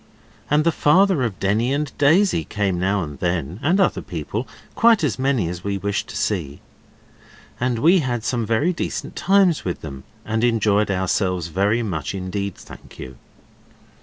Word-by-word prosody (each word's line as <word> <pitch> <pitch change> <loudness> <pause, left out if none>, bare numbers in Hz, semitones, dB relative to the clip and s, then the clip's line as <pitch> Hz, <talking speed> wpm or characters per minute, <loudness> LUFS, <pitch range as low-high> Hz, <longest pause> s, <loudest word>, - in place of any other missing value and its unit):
And 150 +1 +3
the 170 - +3
father 180 +1 +3
of 115 -6 -2
Denny 110 +6 +1
and 145 0 -2
Daisy 155 - +3
came 95 +1 -2
now 95 +1 0
and 75 -3 -8
then, 85 0 -2
and 175 +7 +2
other 195 - +2
people, - - -5 0.3
quite 230 -5 +4
as 135 -4 0
many 130 -8 +1
as 90 +1 -6
we 100 -1 -2
wished 100 +1 -2
to - - -7
see. 80 -9 -2 1.0
And 125 -1 0
we 170 +10 +4
had 120 -6 -2
some 120 -1 -1
very 115 +11 +1
decent - - -4
times 190 -4 +3
with 90 - -4
them; 70 -3 -8 0.2
and 110 +1 -1
enjoyed 105 -3 +2
ourselves 90 -2 0
very 100 +7 +1
much 90 -4 -3
indeed, 95 +1 -4
thank - - -14
you. 65 - -9
110 Hz, 165 wpm, -21 LUFS, 90-145 Hz, 1.0 s, quite